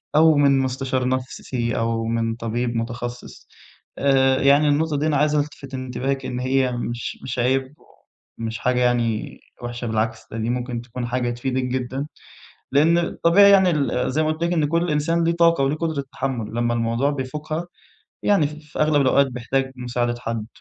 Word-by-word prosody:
أو 160 0 +6
من 140 -1 +4
مستشار 130 -1 -1
نفسي 125 -2 -2
أو 115 0 -1
من 115 0 -1
طبيب 120 +1 -2
متخصص، 120 +1 -5 0.5
آآ 135 -1 +3
يعني 140 +2 +5
النقطة 150 +1 +1
دي 155 +2 0
أنا 150 - +2
عايز 150 +1 +2
ألتفت 145 -2 -3
انتباهِك 130 +1 -3
إن 125 - -3
هي 130 0 +1
مش 120 0 -4
مش 130 - -4
عيب 130 +3 +1 0.7
ومش 115 0 -3
حاجة 125 0 +1
يعني 120 -3 0 0.2
وحشة 120 0 -5
بالعكس 110 +1 -1
ده 115 - -5
دي 115 +1 -2
ممكن 120 -1 -2
تكون 120 +1 -6
حاجة 120 0 -1
تفيدِك 130 +2 -2
جدًا، 130 +2 -3 0.7
لأن 160 +4 +4
الطبيعي 175 +3 +4
يعني 190 -2 +6
ال 140 -4 0
زي 155 +3 +1
ما 155 0 +1
قُلت 160 +2 -3
لِك 170 - 0
إن 160 -3 +2
كل 170 +2 0
إنسان 165 +3 +1
له 170 - +2
طاقة 170 -4 +3
وليه 140 +3 0
قدرة 155 -3 -2
تحمل 120 -5 -3
لمّا 120 0 0
الموضوع 115 +4 +1
بيفوقها 150 +4 -4 0.6
يعني 195 -8 +3
ف 150 - -6 0.2
في - - -6
أغلب 150 -2 +3
الأوقات 140 +1 +4
بيحتاج 130 +1 -2
مساعدة 120 -1 -1
حد، 115 -2 -4
130 Hz, 175 wpm, -22 LUFS, 120-150 Hz, 0.7 s, أو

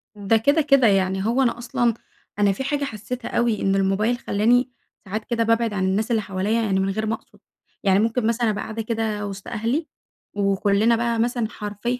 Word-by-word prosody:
ده 205 +2 +2
كده 285 +8 +3
كده، 275 -4 +4
يعني 190 -1 +1
هو 235 +4 +2
أنا 240 -2 +1
أصلًا، 240 0 0 0.5
أنا 205 -1 +4
فيه 195 +7 -4
حاجة 285 +1 -1
حسيتها 245 +1 -6
أوي؛ 235 -3 +1
إن 195 0 +2
الموبايل 195 +5 +1
خلاني 245 +3 +2 0.3
ساعات 215 +3 -4
كده 235 -1 0
بابعد 230 -1 +1
عن 195 -2 -1
الناس 210 +5 0
اللي 225 -2 +2
حواليّا 200 +3 -1
يعني 195 -4 +1
من 190 0 0
غير 215 +3 -2
ما 220 - -1
اقصد، - - -21 0.4
يعني 195 -1 +4
ممكن 225 +1 +1
مثلًا 230 0 +1
ابقى 205 -1 -2
قاعدة 225 +1 -5
كده 220 -2 -2
وسط 195 -1 -8
أهلي، 235 +8 -2 0.5
وكلنا 200 +3 +2
بقى 235 0 -1
مثلًا 240 0 0
حرفيًا 210 +3 -4
220 Hz, 195 wpm, -23 LUFS, 200-235 Hz, 0.5 s, كده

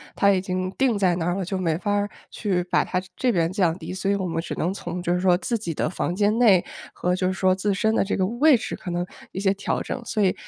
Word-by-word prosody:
它 200 - +4
已 190 - +2
经 185 0 -2
定 255 -5 +2
在 185 -3 +2
那 165 - -2
儿 175 +1 0
了， 195 - -2
就 190 +2 -3
没 165 -4 0
法 205 +3 -2
儿 205 0 +1 0.2
去 185 -5 -1
把 - - +3
它 180 - -1 0.2
这 255 - +1
边 165 -2 +1
降 180 -3 +1
低， 185 - -7
所 190 +1 -2
以 200 - +3
我 195 -2 -2
们 165 -2 -2
只 - - -5
能 175 +3 -1
从 180 -2 -5
就 175 - +1
是 180 - +1
说 180 -1 +4
自 230 +6 -1
己 190 -6 -4
的 155 - -1
房 175 0 -2
间 210 +2 +2
内， 200 -7 +6 0.3
和 180 - -1
就 185 0 0
是 185 - 0
说 185 0 +2
自 195 +2 0
身 220 +3 +1
的 220 - +2
这 200 - -1
个 185 - +1
位 255 +9 +4
置 230 - -3
可 - - -8
能 175 0 -1 0.3
一 - - -4
些 195 -1 +3
调 200 +1 -2
整。 255 - -4
所 215 - 0
以， 185 - +3
190 Hz, 310 characters per minute, -24 LUFS, 180-205 Hz, 0.3 s, 内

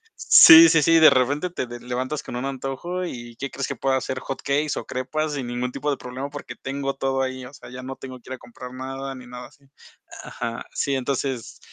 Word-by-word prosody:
sí, 165 +1 +9
sí, 160 -1 +4
sí, 165 +2 +5
de 160 - +9
repente 145 +7 +1
te 130 - -4
levantas 130 +4 -3
con - - -7
un 125 - -4
antojo, 135 +7 -4
¿y 120 -7 -8
qué 140 - -4
crees 135 - -3
que 140 - -3
pueda 135 +2 +1
hacer? 130 0 -4
Hot 135 - -6
cakes 145 +1 0
o - - -5
crepas, 155 +4 -3
sin 130 -3 -4
ningún 125 +1 -3
tipo 150 - -3
de - - 0
problema, 130 +3 -6
porque 145 0 -8
tengo 135 +1 -3
todo 135 0 -1
ahí, 130 -1 -4
o 130 - -12
sea, - - -13
ya 125 - -8
no 135 +1 -6
tengo 130 -1 -9
que 125 - -14
ir - - -2
a - - -17
comprar 125 +1 -11
nada, 135 +1 -6
ni 125 -1 -11
nada 125 0 -9
así 140 +1 -25 0.6
Aja, 115 -1 -6
sí, 140 - -1
entonces, 130 -2 -3
135 Hz, 230 wpm, -23 LUFS, 125-140 Hz, 0.6 s, sí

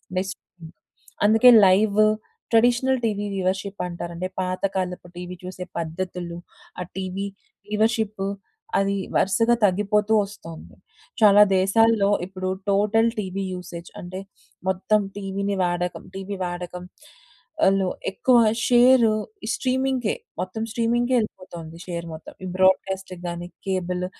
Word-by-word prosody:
బేసిక్‌గా 190 +1 -2 0.9
అందుకే 225 +4 +7 0.2
live 200 +2 +4 0.5
traditional 245 +3 +3
TV 205 -2 -1
viewership 190 +1 -2
అంటారండి. 175 +1 -5
పాత 185 0 -3
కాలపు 180 -1 -3
టీవీ 180 0 -6
చూసే 185 0 -6
పద్ధతులు, 170 +1 -4 0.4
ఆ - - -2
టీవీ 190 +1 -3 0.4
వ్యూవర్షిప్ 215 -1 0 0.6
అది 195 0 +1 0.2
వరుసగా 230 +5 +3
తగ్గిపోతూ 210 +2 +2
ఒస్తొంది. 165 -5 -11 0.5
చాలా 205 -1 +7 0.2
దేశాల్లో 205 +2 +3 0.2
ఇప్పుడు 185 0 -5 0.2
టోటల్ 215 +3 +3
టీవీ 195 -1 -3
యూసేజ్ 175 -1 -8
అంటే 185 0 -7 0.5
మొత్తం 195 +3 +2 0.2
టీవీని 200 0 -2
వాడకం 175 0 -2
టీవీ 195 +1 -5
వాడకం. 175 0 -6 0.8
వాళ్ళు 195 -1 +3 0.2
ఎక్కువ 250 +5 +3 0.3
షేర్ 245 -1 +6 0.5
స్ట్రీమింగ్‌కే 260 -3 0 0.3
మొత్తం 185 +5 -4
స్ట్రీమింగ్‌కే 240 +2 +1
ఎళ్ళిపోతొంది 170 -6 -8
షేర్ 170 -1 -4
మొత్తం. 160 - -10
ఈ - - -4
బ్రోడ్‌కా‌స్ట్‌కి 190 -1 +1
గాని 175 0 -6 0.2
కేబుల్ 180 -1 -1
195 Hz, 110 wpm, -24 LUFS, 180-215 Hz, 0.9 s, అందుకే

